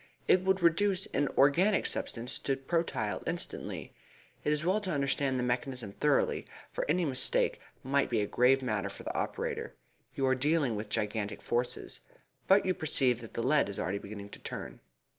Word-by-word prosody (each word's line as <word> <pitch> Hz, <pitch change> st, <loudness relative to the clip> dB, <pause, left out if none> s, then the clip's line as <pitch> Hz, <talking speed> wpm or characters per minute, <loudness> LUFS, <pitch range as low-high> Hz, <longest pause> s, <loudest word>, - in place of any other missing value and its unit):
"It 185 Hz, -, +5 dB
would 190 Hz, -1 st, +1 dB
reduce 190 Hz, +3 st, +3 dB
an 145 Hz, -, +2 dB
organic 175 Hz, +9 st, +4 dB
substance 120 Hz, +1 st, -3 dB
to 135 Hz, -, 0 dB
protyle 135 Hz, -7 st, -1 dB
instantly. -, -, -4 dB, 0.5 s
It 150 Hz, -, +1 dB
is 150 Hz, +2 st, 0 dB
well 195 Hz, +4 st, +2 dB
to 195 Hz, -, -5 dB
understand 140 Hz, -3 st, +1 dB
the 125 Hz, -, 0 dB
mechanism 125 Hz, -3 st, -2 dB
thoroughly, 145 Hz, +7 st, +1 dB, 0.2 s
for -, -, -3 dB
any 175 Hz, +3 st, +2 dB
mistake 130 Hz, -3 st, +2 dB, 0.2 s
might 140 Hz, +1 st, +1 dB
be 115 Hz, -, +1 dB
a -, -, +1 dB
grave 130 Hz, +5 st, +3 dB
matter 105 Hz, -5 st, -1 dB
for -, -, -10 dB
the -, -, -4 dB
operator. -, -, -3 dB, 0.4 s
You 135 Hz, -, 0 dB
are 130 Hz, -, +4 dB
dealing 140 Hz, -2 st, +1 dB
with 105 Hz, 0 st, -5 dB
gigantic 105 Hz, 0 st, -2 dB
forces. 120 Hz, +1 st, -1 dB, 0.5 s
But 195 Hz, +1 st, +5 dB
you 185 Hz, -, +2 dB
perceive 135 Hz, -8 st, +2 dB
that 115 Hz, -, -11 dB
the 115 Hz, -, -1 dB
lead 140 Hz, -4 st, +3 dB
is 100 Hz, -, -5 dB
already 100 Hz, +2 st, -1 dB
beginning 100 Hz, 0 st, -8 dB
to -, -, -11 dB
turn." -, -, -7 dB
135 Hz, 180 wpm, -31 LUFS, 115-165 Hz, 0.5 s, It